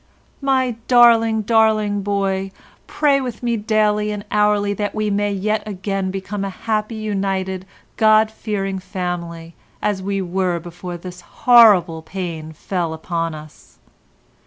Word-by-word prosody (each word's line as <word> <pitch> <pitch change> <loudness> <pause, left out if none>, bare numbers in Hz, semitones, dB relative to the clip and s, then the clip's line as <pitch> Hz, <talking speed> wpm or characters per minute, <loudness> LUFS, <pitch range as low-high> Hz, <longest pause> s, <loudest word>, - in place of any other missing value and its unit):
"My 260 -4 +1
darling, 230 -3 +5
darling 215 -2 +2
boy, 195 -1 -1 0.4
pray 280 -2 +2
with 245 -3 -6
me 235 -1 +1
daily 210 -1 +1
and 205 0 -5
hourly 210 -1 +2
that 205 +1 -3
we 215 -1 -1
may 205 0 0
yet 210 +2 -1
again 195 -1 -3
become 195 +1 -4
a 195 - -2
happy, 215 +2 -2
united, 195 -3 -2 0.3
God 215 0 +4
fearing 195 -3 -3
family 175 -3 -5 0.3
as 205 -2 -1
we 195 +1 -2
were 185 -1 -1
before 175 +1 -7
this 180 +1 -10
horrible 195 -9 +5
pain 165 -3 -6
fell 170 0 -3
upon 165 0 -3
us. 155 0 -14
200 Hz, 135 wpm, -20 LUFS, 185-215 Hz, 0.4 s, darling